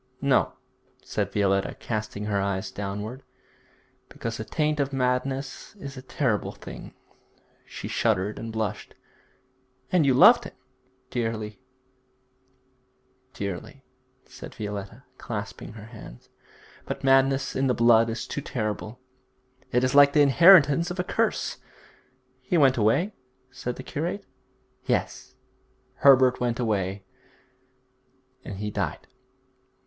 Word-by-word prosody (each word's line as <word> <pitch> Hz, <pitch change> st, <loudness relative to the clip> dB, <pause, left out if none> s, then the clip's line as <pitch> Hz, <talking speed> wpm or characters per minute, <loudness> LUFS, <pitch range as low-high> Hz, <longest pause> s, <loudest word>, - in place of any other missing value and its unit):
'No,' -, -, +2 dB, 0.5 s
said -, -, -2 dB
Violetta, 95 Hz, -1 st, +1 dB
casting 105 Hz, -2 st, -4 dB
her 100 Hz, -2 st, 0 dB
eyes 95 Hz, -1 st, -2 dB
downward, 105 Hz, +6 st, -5 dB, 0.9 s
'because 115 Hz, -1 st, -5 dB
the 110 Hz, -, -4 dB
taint 150 Hz, +5 st, -1 dB
of 140 Hz, -1 st, 0 dB
madness 135 Hz, +4 st, -2 dB
is 140 Hz, -9 st, -9 dB
a 130 Hz, -, -8 dB
terrible 125 Hz, -4 st, -1 dB
thing.' -, -, -10 dB, 0.7 s
She -, -, -7 dB
shuddered 100 Hz, +3 st, 0 dB
and 115 Hz, 0 st, -6 dB
blushed. 110 Hz, -2 st, -4 dB, 1.0 s
'And 180 Hz, -3 st, +4 dB
you 135 Hz, -3 st, +3 dB
loved 235 Hz, -, +7 dB
him?' -, -, -9 dB, 0.6 s
'Dearly, 115 Hz, -2 st, -3 dB, 1.8 s
dearly,' 100 Hz, +7 st, -6 dB, 0.4 s
said -, -, -11 dB
Violetta, 105 Hz, +3 st, -6 dB, 0.2 s
clasping 110 Hz, -1 st, -6 dB
her 105 Hz, -1 st, -10 dB
hands. 110 Hz, -, -13 dB, 0.6 s
'But -, -, -5 dB
madness 135 Hz, 0 st, +3 dB
in 135 Hz, 0 st, +1 dB
the 125 Hz, -, +2 dB
blood 115 Hz, -1 st, +5 dB
is 115 Hz, -, -4 dB
too 140 Hz, -, -4 dB
terrible; 110 Hz, -2 st, -4 dB, 0.7 s
it 125 Hz, +1 st, +2 dB
is 130 Hz, -, +1 dB
like 140 Hz, 0 st, +7 dB
the 150 Hz, -, +5 dB
inheritance 165 Hz, +1 st, +6 dB
of 180 Hz, +1 st, -6 dB
a -, -, +2 dB
curse.' -, -, -1 dB, 0.8 s
'He 130 Hz, +7 st, 0 dB
went 135 Hz, -4 st, +5 dB
away?' 135 Hz, -, +2 dB, 0.4 s
said 125 Hz, -2 st, -5 dB
the -, -, -8 dB
curate. 175 Hz, +7 st, -4 dB, 0.6 s
'Yes, -, -, -2 dB, 0.6 s
Herbert 130 Hz, -2 st, +5 dB
went 120 Hz, -1 st, -1 dB
away; 100 Hz, -4 st, -1 dB, 1.4 s
and 100 Hz, -, -7 dB
he 105 Hz, +1 st, -4 dB
died. -, -, -3 dB
125 Hz, 120 wpm, -26 LUFS, 105-140 Hz, 1.8 s, loved